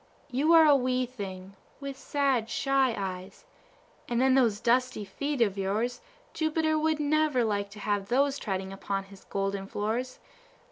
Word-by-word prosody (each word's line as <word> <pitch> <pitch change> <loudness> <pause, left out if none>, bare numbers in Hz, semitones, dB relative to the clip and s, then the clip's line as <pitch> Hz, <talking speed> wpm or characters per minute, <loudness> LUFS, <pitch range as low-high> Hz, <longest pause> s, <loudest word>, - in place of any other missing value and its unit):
You 285 +6 +2
are 325 -1 +8
a 295 -2 +7
wee 255 -1 +1
thing, 195 -5 -8 0.2
with 275 -1 -6
sad, 265 -5 0
shy 270 -3 +1
eyes; 190 - -6 0.6
and 240 -1 0
then 260 +1 +4
those 235 -6 +3
dusty 240 -2 +1
feet 280 +7 -3
of 200 -3 -2
yours 215 +6 -1 0.3
Jupiter 315 0 +1
would 315 0 +1
never 300 -3 +2
like 205 -2 -1
to 210 +1 -12
have 205 -1 -1
those 275 +3 +2
treading 190 -2 -3
upon 195 0 -3
his 195 0 -16
golden 195 0 -2
floors. 225 +6 -3
240 Hz, 155 wpm, -28 LUFS, 200-275 Hz, 0.6 s, are